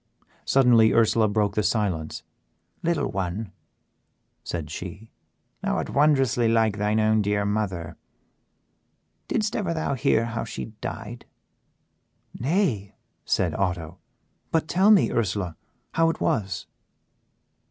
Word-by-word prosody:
Suddenly 120 -4 +5
Ursela 115 -1 +4
broke 105 -2 +1
the 105 - +1
silence. 95 -8 -1 0.6
"Little 165 -4 0
one," 95 +2 -3 0.9
said 80 -3 -5
she, 95 +7 -8 0.5
"thou - - 0
art - - -3
wondrously 135 -5 +3
like 110 -2 +2
thy 105 +1 +1
own 110 0 +3
dear 100 0 0
mother; 95 -6 -2 1.3
didst 215 -1 -1
ever 170 -7 -1
hear 115 -2 +2
how 115 -1 -3
she 110 - -7
died?" 120 +3 -6 1.1
"Nay," 130 - -1 0.3
said - - +1
Otto, 90 -3 -2 0.5
"but 160 -1 0
tell 190 +5 +3
me, 210 -3 +5
Ursela, 95 -6 -1 0.4
how 165 0 +3
it 165 - -3
was." 100 -4 -1
110 Hz, 110 wpm, -25 LUFS, 100-135 Hz, 1.3 s, Suddenly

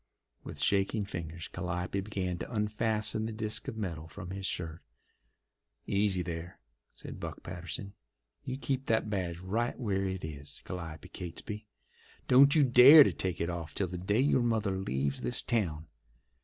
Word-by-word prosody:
With - - -8
shaking 100 +1 +2
fingers 85 -3 -6
Calliope 90 +1 -3
began 95 -3 -3
to - - -6
unfasten 110 0 0
the - - -4
disc 110 +1 -3
of 110 - -4
metal 85 -7 -4
from 90 +2 -8
his 95 0 -3
shirt. 80 -1 -4 1.0
"Easy 100 -2 +1
there!" 85 0 -6 0.3
said - - -9
Buck - - -6
Patterson. 90 +2 -6 0.5
"You 130 0 -4
keep 135 -1 -2
that 110 -1 +1
badge 90 -4 -2
right 110 +9 -2
where 100 -5 0
it 95 -3 -3
is, 70 -2 -8
Calliope 85 0 -7
Catesby. 105 +4 -6 0.6
Don't 140 +3 +7
you 150 - +6
dare 135 +4 +10
to - - 0
take 90 -2 -2
it 85 +1 -1
off 80 -4 -6
till 100 - +1
the 90 0 -5
day 100 +5 +1
your 135 -2 +3
mother 110 -5 +1
leaves 70 -7 -1
this 120 - -2
town. 85 -10 -1
95 Hz, 160 wpm, -31 LUFS, 85-110 Hz, 1.0 s, dare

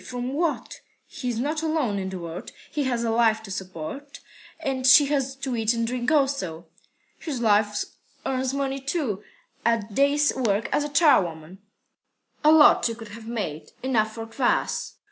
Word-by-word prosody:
From 250 +1 -4
what? 320 +1 -2 0.2
He's 250 -4 -4
not 300 +5 -1
alone 305 -11 0
in 190 0 -3
the 190 - -5
world. 170 +1 -7 0.2
He 290 -2 -1
has 240 -2 0
a 230 - 0
wife 225 -1 +3
to 205 - -9
support, 190 - -7 0.4
and 265 -4 -1
she 270 +2 +8
has 270 -1 -1
to 270 -2 -3
eat 225 0 +1
and 230 0 0
drink 245 +2 -1
also." 270 - 0 0.5
"His 290 -6 -4
wife 210 -2 +2 0.4
earns 260 -1 -1
money, 275 0 -2
too, 270 - -2 0.4
at 225 -3 0
day's 285 +4 +3
work 225 -4 0
as 295 0 +1
charwoman." 190 - +2 0.8
"A 305 - +7
lot 315 -1 +7
she 230 - 0
could 225 -2 -10
have 220 +2 -10
made! 160 -10 -5
Enough 220 -5 +1
for 225 -1 -5
kvas." 235 +3 -1
240 Hz, 165 wpm, -25 LUFS, 210-275 Hz, 0.8 s, she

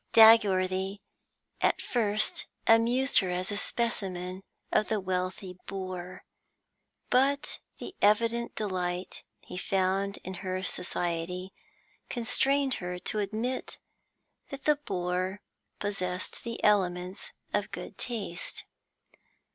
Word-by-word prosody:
Dagworthy 195 -3 +6 0.6
at - - +3
first 215 -3 +2 0.2
amused 240 +4 +5
her 190 - -1
as 180 +2 -1
a - - -2
specimen 190 -4 -2 0.3
of 215 - +3
the 215 - +1
wealthy 185 0 -3
boor, 185 -2 -5 0.9
but 275 +3 +2 0.2
the 375 - -7
evident 230 +3 +3
delight 180 -3 -2 0.2
he - - -8
found 195 +1 +1
in 185 - -5
her 185 0 -2
society 180 +1 -1 0.6
constrained 270 +3 +2
her 180 0 -3
to 210 +4 -3
admit 220 +5 -2 0.7
that 275 -1 -8
the 300 -1 +5
boor 185 -5 -2 0.4
possessed 185 -3 -3
the 230 -1 -5
elements 185 - +1 0.2
of - - +1
good - - -8
taste. 200 -7 -4
195 Hz, 105 wpm, -30 LUFS, 185-225 Hz, 0.9 s, Dagworthy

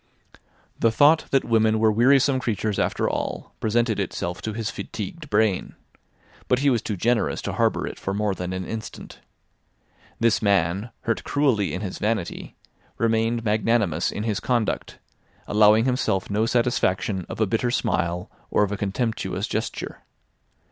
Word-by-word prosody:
The 115 - +4
thought 145 +8 +4
that 135 - +2
women 110 -1 +3
were 110 0 +4
wearisome 130 +4 +4
creatures 110 -4 -1
after - - 0
all - - -3
presented 115 0 +1
itself 90 -2 -3
to 110 - -4
his 110 0 -3
fatigued 145 - -7
brain. 105 -3 +1 0.7
But 125 - +3
he 140 +1 +3
was 120 -3 +1
too 105 - -4
generous 115 +4 +1
to - - -3
harbour - - +1
it - - -7
for 95 - -3
more 105 0 0
than 90 -1 -5
an 95 0 -4
instant. 110 +2 -7 1.0
This 115 -1 +2
man, 100 +1 +1
hurt 115 - -1
cruelly 130 -9 +1
in 90 - -4
his 95 -3 -5
vanity, 105 -4 -2 0.4
remained 115 +1 +1
magnanimous 105 -5 +1
in 105 - -4
his 110 -3 -1
conduct, 120 -4 -1 0.5
allowing 105 +2 +5
himself 125 -7 0
no 110 +2 +1
satisfaction 105 -6 0
of - - -6
a 110 - +4
bitter 115 +4 0
smile 90 -6 -1 0.2
or - - +3
of 100 - -1
a 105 - -2
contemptuous 110 +4 -2
gesture. - - -4
110 Hz, 155 wpm, -24 LUFS, 100-120 Hz, 1.0 s, allowing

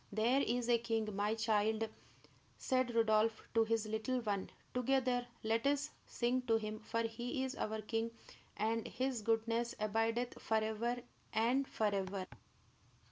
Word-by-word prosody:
"There 230 +6 +3
is 245 -2 0
a 240 -1 +4
king, 225 -3 -1
my 205 +2 +1
child," 220 0 +2 0.7
said 255 -2 +1
Rodolph 220 0 +3
to 225 0 +5
his 225 -1 +1
little 220 +4 -1
one. 200 -4 -1 0.2
"Together 250 -1 +1 0.2
let 225 +3 +2
us 285 +1 +1 0.2
sing 250 +1 +1
to 225 - +4
him, 215 0 -4
for 230 +1 -1
he 240 +3 -2
is 265 0 -2
our 220 -4 -3
king, 225 +1 -1 0.5
and 225 +2 0
his 255 -3 -1
goodness 230 +2 +1
abideth 225 +3 0
forever 220 +2 0 0.3
and 250 +5 +2
forever." 195 -3 -1
225 Hz, 135 wpm, -37 LUFS, 220-245 Hz, 0.7 s, to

